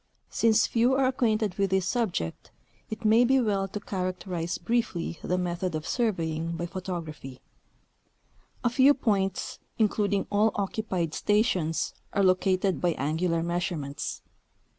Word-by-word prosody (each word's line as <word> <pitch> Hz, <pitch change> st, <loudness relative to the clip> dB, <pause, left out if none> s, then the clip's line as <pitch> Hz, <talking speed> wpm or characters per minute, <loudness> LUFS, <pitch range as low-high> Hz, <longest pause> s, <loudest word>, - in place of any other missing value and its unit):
Since 225 Hz, -1 st, +3 dB
fcAV 245 Hz, +3 st, +2 dB
are 270 Hz, -, +3 dB
acquainted 220 Hz, -6 st, +1 dB
with 195 Hz, -1 st, +2 dB
this 190 Hz, 0 st, +1 dB
subject, 190 Hz, -, -2 dB, 0.4 s
it 220 Hz, +1 st, -6 dB
may 225 Hz, +3 st, +6 dB
be 265 Hz, +2 st, +4 dB
well 200 Hz, -5 st, +1 dB
to 205 Hz, +2 st, -5 dB
characterize 185 Hz, -3 st, -3 dB
briefly 175 Hz, -5 st, -1 dB
the 180 Hz, -, -1 dB
method 180 Hz, -1 st, -2 dB
of 155 Hz, 0 st, -4 dB
surveying 165 Hz, -8 st, -1 dB
b}^ 170 Hz, +1 st, -3 dB
photography. 165 Hz, -8 st, -6 dB, 1.2 s
A 240 Hz, -, +2 dB
few 270 Hz, +3 st, +5 dB
points, 195 Hz, -6 st, -1 dB, 0.2 s
including 205 Hz, -2 st, +1 dB
all 210 Hz, +2 st, +3 dB
occupied 190 Hz, -5 st, -2 dB
stations, 185 Hz, -, +1 dB, 0.2 s
are 200 Hz, -, +2 dB
located 185 Hz, 0 st, +2 dB
by 175 Hz, -2 st, +2 dB
angular 165 Hz, +4 st, 0 dB
measurements. 170 Hz, -5 st, -3 dB
190 Hz, 130 wpm, -27 LUFS, 170-220 Hz, 1.2 s, may